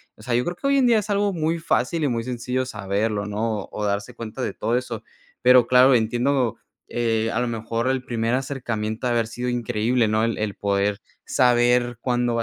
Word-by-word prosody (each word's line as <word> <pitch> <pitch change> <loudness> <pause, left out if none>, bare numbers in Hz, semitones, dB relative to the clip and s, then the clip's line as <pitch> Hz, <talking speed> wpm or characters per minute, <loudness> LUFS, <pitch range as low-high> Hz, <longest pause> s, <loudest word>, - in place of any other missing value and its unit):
O - - -17
sea, 120 +2 -1
yo 125 - +2
creo 175 - -3
que 275 - -3
hoy 280 - +3
en 265 - +4
día 230 -3 +5
es 210 - -6
algo 200 0 +1
muy 165 0 0
fácil 165 -1 0
y - - +2
muy 115 -3 -1
sencillo 125 +1 -2
saberlo, 100 0 -2
¿no? 105 +1 -2
O 105 - -8
o - - -1
darse 100 +4 -2
cuenta 115 +2 -6
de - - -2
todo 120 +2 0
eso. 125 - -5 0.4
Pero 125 -1 +6
claro, 130 +1 +6
entiendo, 120 +2 +1 0.3
eh, 115 -1 0
a - - 0
lo 125 - 0
mejor 115 +1 -2
el 130 -1 0
primer 115 0 0
acercamiento 120 -4 -3
ha - - +1
de 120 - +1
haber 115 -1 +2
sido 125 +2 -4
increíble, 120 0 0
¿no? 110 +1 +1
El 115 - 0
el 105 -2 -2
poder 100 +1 0 0.3
saber 120 -1 +3
cuándo 120 -1 0
va 115 - +1
120 Hz, 220 wpm, -23 LUFS, 110-130 Hz, 0.4 s, Pero